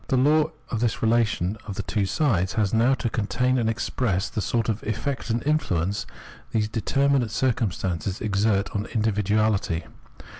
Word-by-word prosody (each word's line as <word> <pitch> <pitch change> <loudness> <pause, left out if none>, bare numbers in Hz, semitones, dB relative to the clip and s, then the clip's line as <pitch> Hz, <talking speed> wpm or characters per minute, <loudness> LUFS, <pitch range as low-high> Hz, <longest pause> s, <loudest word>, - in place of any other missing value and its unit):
The 130 - +2
law 150 +4 +4 0.3
of 115 - -1
this 115 -1 -1
relation 110 -3 +1
of 100 - -5
the 100 - -3
two 100 0 -1
sides 95 - +1
has 105 -4 0
now 120 +4 +4
to 125 - -3
contain 125 +4 0
and 115 -2 +1
express 115 -3 -1
the 105 - -3
sort 115 +2 0
of 110 -1 -1
effect 130 +5 -3
and 115 +2 -1
influence 100 - 0 0.4
these 110 -1 0
determinate 135 +3 +1
circumstances 100 -6 -1
exert 100 -1 +1
on 105 +2 -1
individuahty. 105 -4 +1
110 Hz, 155 wpm, -25 LUFS, 100-120 Hz, 0.4 s, law